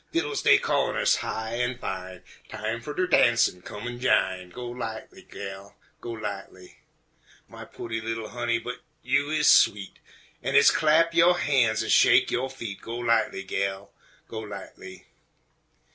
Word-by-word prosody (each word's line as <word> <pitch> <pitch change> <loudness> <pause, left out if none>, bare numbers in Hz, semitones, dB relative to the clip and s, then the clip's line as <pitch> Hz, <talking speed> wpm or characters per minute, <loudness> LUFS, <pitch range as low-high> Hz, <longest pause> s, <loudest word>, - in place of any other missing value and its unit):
Fiddles 350 +6 -1
dey - - +6
callin' - - 0
us - - +3
high 110 +1 -4
an' 120 0 -1
fine, 95 -4 -6 0.3
"Time 110 +2 -4
fer 150 - -7
de 185 - +1
darnsin', 120 - +3
come 105 +5 -8
an' 120 0 -6
jine," 95 -7 +1
Go 125 +7 -8
lightly, 115 -2 -7
gal, 100 0 -9 0.2
go - - -8
lightly! 100 -4 -8 0.7
My - - -11
pooty 115 -1 -6
li'l 115 0 -4
honey, 120 -1 -1
but 120 +2 -7 0.2
you 140 +3 +1
is 155 -1 0
sweet! 100 -1 +3 0.4
An' - - -2
hit's - - +7
clap 160 +2 +3
yo' 170 +1 +5
han's 125 -8 +1
an' 110 - -5
shake 125 +1 +5
yo' 130 +2 -1
feet, 115 -7 -8
Go 115 - -7
lightly, 115 -4 0
gal, 95 0 -3 0.4
go 110 - -6
lightly! 100 -3 -10
115 Hz, 155 wpm, -26 LUFS, 100-130 Hz, 0.7 s, hit's